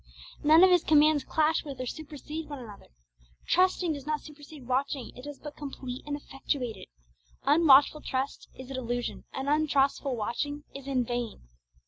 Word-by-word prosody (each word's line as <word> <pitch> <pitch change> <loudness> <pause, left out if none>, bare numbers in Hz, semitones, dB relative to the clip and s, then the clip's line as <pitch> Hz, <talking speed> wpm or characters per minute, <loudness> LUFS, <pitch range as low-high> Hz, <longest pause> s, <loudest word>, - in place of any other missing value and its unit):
None 315 +4 +7
of 375 - +7
His 355 -2 +5
commands 305 -1 +5
clash 315 +1 +1
with 280 -4 -8
or 255 - -3
supersede 305 +2 -7
one 290 - -5
another. 220 -6 -11 0.6
Trusting 365 -2 +3
does 285 -1 -8
not 305 -1 -1
supersede 295 -2 -12
watching; 260 0 -1
it 250 - -10
does 290 -1 -7
but 295 -1 -9
complete 270 -3 -6
and 290 - -2
effectuate 270 -4 -3
it. - - -12 0.6
Unwatchful 290 0 +6
trust 265 +1 -3
is 260 0 -9
a - - -4
delusion, 245 -1 -3
and 270 +1 -4
untrustful 280 -2 +2
watching 285 +7 -3
is 275 0 -9
in 260 -3 +1
vain. 240 -2 -3
285 Hz, 165 wpm, -29 LUFS, 260-305 Hz, 0.6 s, None